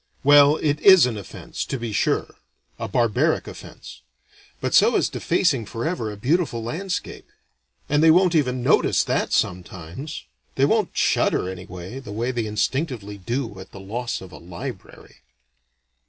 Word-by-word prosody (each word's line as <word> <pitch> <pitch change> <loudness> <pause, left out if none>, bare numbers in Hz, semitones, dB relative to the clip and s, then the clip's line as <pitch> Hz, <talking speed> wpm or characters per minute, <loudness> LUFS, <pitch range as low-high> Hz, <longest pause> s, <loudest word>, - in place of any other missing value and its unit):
Well, 145 +1 +7
it 150 -1 0
is 190 -4 +7
an 125 -3 -2
offense 100 -3 -7
to 135 - -4
be 115 -3 -5
sure - - 0 0.5
a - - -3
barbaric 115 -3 +1
offense. 60 - -11 0.6
But - - -3
so - - +5
is - - +2
defacing 110 - 0
forever 115 -1 -3
a 105 - -9
beautiful 130 - 0
landscape; 180 - -5 0.6
and 150 +1 +2
they 160 - +6
won't 180 +2 +5
even 130 -6 +1
notice - - +3
that - - -1
sometimes; 90 - -3 0.3
they 135 - +3
won't 215 +4 0
shudder - - +1
anyway, 90 +4 -8
the 130 -6 -10
way 115 +4 -2
they 120 -3 -2
instinctively 105 -1 -2
do 115 0 -4
at 95 - -12
the 100 - -9
loss 115 +5 -4
of 95 -1 -11
a 75 - -11
"library." 95 +6 -9
120 Hz, 155 wpm, -23 LUFS, 100-145 Hz, 0.6 s, Well